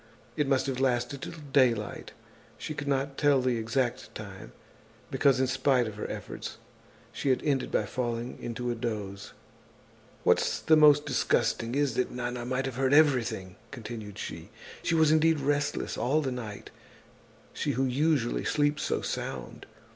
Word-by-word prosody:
It 150 - 0
must 135 -1 +2
have 135 -2 -2
lasted 130 +1 0
till - - -6 0.2
daylight. 120 -6 +2 0.5
She 155 - -5
could 145 -1 -5
not 135 0 -1
tell 145 -2 +4
the 125 -2 +1
exact 120 +2 -2
time, 100 -3 -9 0.6
because, 135 -2 +3
in 130 - +3
spite 130 -1 +2
of 110 - -5
her 105 - -5
efforts, - - -6 0.5
she 140 - -2
had 130 - +2
ended 140 -3 0
by - - +1
falling 120 -1 -3
into 120 +1 -3
a - - 0
dose. 105 -4 -5 0.9
"What's - - +2
most 150 -2 +7
disgusting 115 +2 +1
is 140 -3 +1
that 125 +2 0
Nana 120 -1 -4
might 130 +1 -1
have 130 -2 -4
heard 135 +1 +3
everything," 120 - +2
continued 110 -5 -8
she. - - -6 0.3
"She 170 - 0
was 160 -1 +5
indeed 160 0 +4
restless 145 +1 -1
all 140 +6 +2
the 135 -3 -2
night, 110 -5 -7 0.8
she - - -1
who 135 +3 +1
usually 135 -1 +1
sleeps 145 0 +1
so - - -1
sound. - - -5
130 Hz, 155 wpm, -29 LUFS, 120-145 Hz, 0.9 s, most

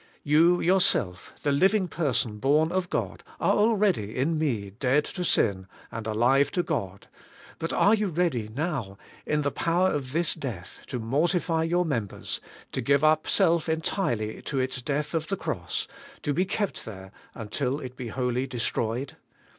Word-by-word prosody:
You 165 +4 +4
yourself, 160 - +2
the 145 - +2
living 190 +6 +3
person 125 -10 -1
born 150 +7 +3
of 185 -1 -1
God, - - -2 0.2
are - - +3
already 205 - +2
in 150 +6 +1
me 120 -11 -1
dead 130 +7 +1
to 180 - -4
sin 95 - +1 0.2
and 110 -1 -5
alive 125 +6 +3
to 175 - +1
God; 100 - -3 0.5
but 165 0 -2
are 205 - +4
you 215 -2 +2
ready 160 - 0
now, 135 - -2 0.3
in 150 0 +1
the 145 - 0
power 175 +5 +1
of 135 -3 -3
this 165 +2 +1
death, 105 -10 -6
to 125 - -3
mortify 160 +8 +1
your 175 +2 +1
members, 115 - -3 0.3
to 130 - -2
give 140 +4 +2
up 155 0 +4
self 170 -4 +2
entirely 160 - -1
to 140 - -4
its 130 0 -1
death 145 +5 -2
of 160 -1 -1
the 195 - -2
cross, 435 0 -3 0.4
to 145 - 0
be 180 +6 +1
kept 200 +1 -2
there 95 -3 -9 0.2
until 125 +5 -2
it 130 -3 -8
be 125 -2 -6
wholly 125 +2 -1
destroyed? 120 +1 -2
145 Hz, 165 wpm, -27 LUFS, 120-170 Hz, 0.5 s, You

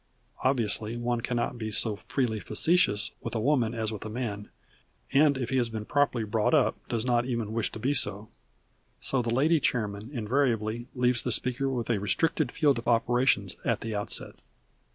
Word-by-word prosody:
Obviously 115 -3 0
one 120 0 -1
cannot 120 0 -2
be 110 -1 -3
so 110 0 0
freely 110 +1 -2
facetious 110 - +1
with - - -5
a - - +1
woman 120 -2 +1
as 110 -1 -1
with 105 - -6
a 110 - -6
man, 105 -3 -4 0.6
and 140 0 +5
if 125 -1 -3
he 130 - +2
has 120 -2 +1
been 110 -2 -5
properly 145 -4 +1
brought 110 +7 +1
up 145 - +3
does 115 -1 -1
not 120 -1 +2
even 115 -4 -2
wish 115 -1 0
to - - -7
be 130 +6 0
so. 105 -6 +1 0.7
So 135 - 0
that 115 - -3
the 115 - 0
Lady 155 +5 +3
Chairman 105 -4 -1
invariably 120 -2 0
leaves 125 -2 +2
the - - -1
speaker 130 +2 +1
with 120 -3 -2
a 110 - +1
restricted 140 +6 +1
field 145 -5 +2
of 115 - -9
operations 120 -4 +2
at - - 0
the 115 -1 -4
outset. 105 - -3
120 Hz, 190 wpm, -28 LUFS, 110-130 Hz, 0.7 s, and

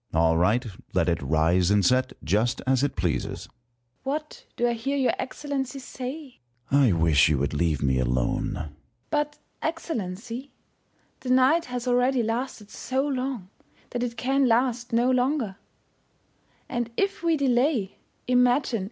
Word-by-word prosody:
Sun. 80 - +1
All 80 0 +4
right. 105 +10 +2 0.3
Let 85 - +3
it 85 - 0
rise 80 +5 +2
and 100 -2 +3
set, 130 +4 +2
just 110 +9 +1
as 130 -1 +2
it 145 - 0
pleases. 85 -9 -2
First - - -10
Hour. - - -44 0.5
What 300 +3 -4
do 240 - +2
I 240 - +1
hear 270 +5 -2
your 265 -2 +2
Excellency 275 -1 -3
say? 265 +2 -7 0.3
Sun. 140 +1 +5
I 125 - +5
wish 80 -3 +4
you 75 - +2
would 70 +2 -1
leave 75 -2 0
me 65 -2 +2
alone. 60 -1 0
First - - -4
Hour. - - -9 0.4
But, 295 0 0 0.2
Excellency, 245 - -4 0.7
the 255 - -6
night 260 +6 +4
has 250 0 -5
already 250 0 +3
lasted 225 -2 -3
so 265 +5 -1
long, 255 -8 -3 0.4
that 240 - -2
it 235 -1 -3
can 270 +3 +2
last 240 +1 +1
no 240 +2 +3
longer; 250 -5 0 1.1
and 240 -2 -2
if 395 0 0
we 335 -2 +2
delay, 250 -5 +1 0.3
imagine. 250 -1 +3
240 Hz, 160 wpm, -26 LUFS, -, 1.1 s, Sun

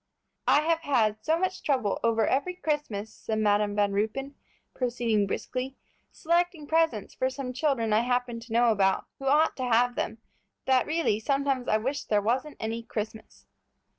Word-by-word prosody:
"I 295 - +5
have 325 +1 +1
had 225 -9 +1
so 320 +1 +2
much 370 +1 -2
trouble 255 -9 0
over 225 -1 +3
every 360 +7 0
Christmas," 290 - -3
said 220 - -4
Madam 205 -1 +2
Van 205 -1 +2
Ruypen, 220 +8 -2 0.4
proceeding 235 -5 0
briskly, 255 +6 -4 0.3
"selecting 340 -1 0
presents 320 -9 +1
for 260 - 0
some 260 -1 -5
children 250 -5 0
I 215 - +5
happen 245 0 -1
to 230 0 -13
know 235 0 +4
about, 195 -2 +2
who 270 - -4
ought 300 +4 +4
to 260 - -3
have 245 0 +3
them, 220 - -2 0.5
that 260 -1 +3
really 315 -9 +1
I - - -7
sometimes 275 +1 0 0.2
wish 280 +3 -2
there 210 - +2
wasn't 255 +8 -1
any 225 +1 -3
Christmas." 220 -1 -7
245 Hz, 165 wpm, -27 LUFS, 220-285 Hz, 0.5 s, I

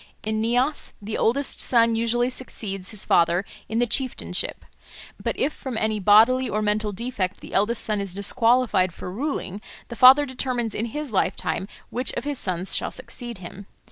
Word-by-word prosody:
In 215 0 -1
Nias 245 +6 0
the 210 +1 -5
eldest 270 +5 +1
son 230 -2 +3
usually 240 +2 +1
succeeds 195 -7 -5
his 215 -3 -3
father 170 +3 +3 0.2
in 225 - -2
the 245 - +3
chieftainship. 255 +2 0 0.6
But - - -2
if 295 +3 0
from 260 -4 -6
any 220 -1 0
bodily 225 +6 +5
or 215 - -1
mental 210 0 0
defect 205 -3 -3
the - - -11
eldest 210 +4 +1
son 210 -2 0
is 195 -2 -4
disqualified 220 -3 +2
for 180 - -7
ruling, 210 -4 -3 0.3
the 235 - -6
father 260 +4 +8
determines 250 -3 -2
in 225 - -2
his 295 +1 -5
lifetime 190 0 -1 0.2
which 250 +2 0
of - - -4
his 290 -2 -3
sons 185 0 -1
shall - - -1
succeed 240 -3 -8
him. 185 +2 -10
225 Hz, 175 wpm, -24 LUFS, 200-255 Hz, 0.6 s, father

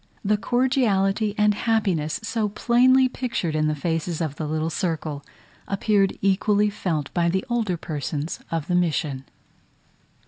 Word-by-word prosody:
The 210 +2 +3
cordiality 215 -3 +1
and 210 0 +4
happiness 200 -9 0
so 225 -2 -1
plainly 255 +5 +4
pictured 235 -11 -3
in 155 0 +2
the 155 - 0
faces 165 +2 -2
of 155 -4 -2
the 155 - -4
little 155 +1 -1
circle, 155 -5 -3 0.4
appeared 200 -1 +1
equally 205 +2 +2
felt 160 -8 -3
by 170 -1 +2
the 190 +6 -1
older 220 -7 0
persons 150 0 -4
of 165 -3 -2
the 180 - -2
mission. 155 -6 0
190 Hz, 140 wpm, -24 LUFS, 155-215 Hz, 0.4 s, and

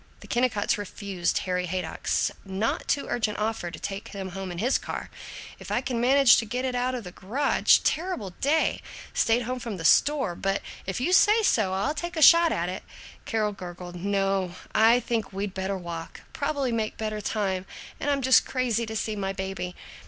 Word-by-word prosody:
The - - -12
Kennicotts 240 -5 +1
refused 195 -3 -2
Harry 180 -1 -1
Haydock's 185 +2 -1
not 195 +3 -2
too 280 - +1
urgent 215 -3 -1
offer 215 -4 -2
to - - -8
take 200 +2 -6
them 195 -2 -5
home 190 0 -6
in 175 - -6
his 240 +9 +2
car - - -6 0.5
"if - - -10
I - - +1
can 240 -3 -2
manage 270 +1 +6
to 225 - 0
get 250 +4 -3
it 255 - -1
out 250 +1 0
of 240 - -5
the 180 - -8
garage 235 +11 +3
terrible 320 - -1
day 310 +3 +2 0.3
stayed 230 +2 +2
home 250 +2 -3
from 230 -5 -5
the 165 - -6
store 275 - +4
but 195 +3 -1 0.2
if 190 - -2
you 340 +9 0
say 425 +4 +5
so, 210 - +2
I'll 200 +10 0
take 345 +3 -5
a - - 0
shot 335 +1 +8
at 170 +1 -1
it." 180 - -4 0.4
Carol 215 -2 0
gurgled, 180 -2 -8
"No, 195 -1 0 0.2
I 230 +3 +5
think 225 -5 -2
we'd 195 0 -4
better 190 +1 -2
walk; 170 -2 -7
probably 285 -3 -1
make 220 -2 -2
better 215 -1 -3
time, 190 -3 -2 0.3
and 290 - -1
I'm 280 -2 +1
just 260 +1 +6
crazy 240 -3 -1
to 220 - -5
see 215 0 -2
my 195 -1 -2
baby." 190 -2 -4
215 Hz, 195 wpm, -26 LUFS, 190-255 Hz, 0.5 s, shot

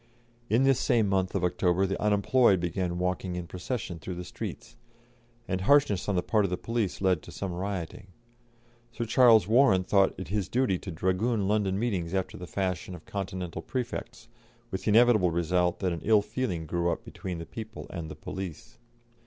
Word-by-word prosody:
In 115 +5 +3
this 135 -2 +4
same 115 -5 +2
month 95 -1 0
of 95 - 0
October 90 +1 +2
the 95 0 -3
unemployed 105 0 +3
began 90 0 -2
walking 90 0 -2
in 90 -1 -4
procession 90 0 -5
through 90 +5 -6
the 90 - -5
streets, - - -7 0.7
and 95 0 -1
harshness 105 -5 +3
on 100 - +1
the 90 - +1
part 105 +2 +2
of 100 - 0
the 90 - -2
police 115 -4 -2
led 95 -4 +2
to - - -12
some 95 -3 -4
rioting. 95 0 -5 0.8
Sir 115 - -3
Charles 115 -4 +6
Warren 110 -5 +5
thought 95 +1 +3
it 95 - -7
his 100 -2 -1
duty 120 -8 +1
to 100 - -8
dragoon 95 +5 0
London 100 -2 +1
meetings 95 -6 -1
after 95 -1 -2
the 90 - -8
fashion 90 +1 -3
of 85 - -13
Continental 95 -3 -5
prefects, 125 -2 -5 0.4
with 95 - -4
the - - +2
inevitable 110 -4 +5
result 85 +1 +1
that 90 -2 0
an 85 - -5
ill 105 -1 +4
feeling 105 -7 -3
grew 85 +2 0
up - - -5
between 90 -2 -6
the 85 - -6
people 110 +3 -8
and 85 -4 -5
the - - -7
police. 95 -5 -7
95 Hz, 185 wpm, -28 LUFS, 90-110 Hz, 0.8 s, Charles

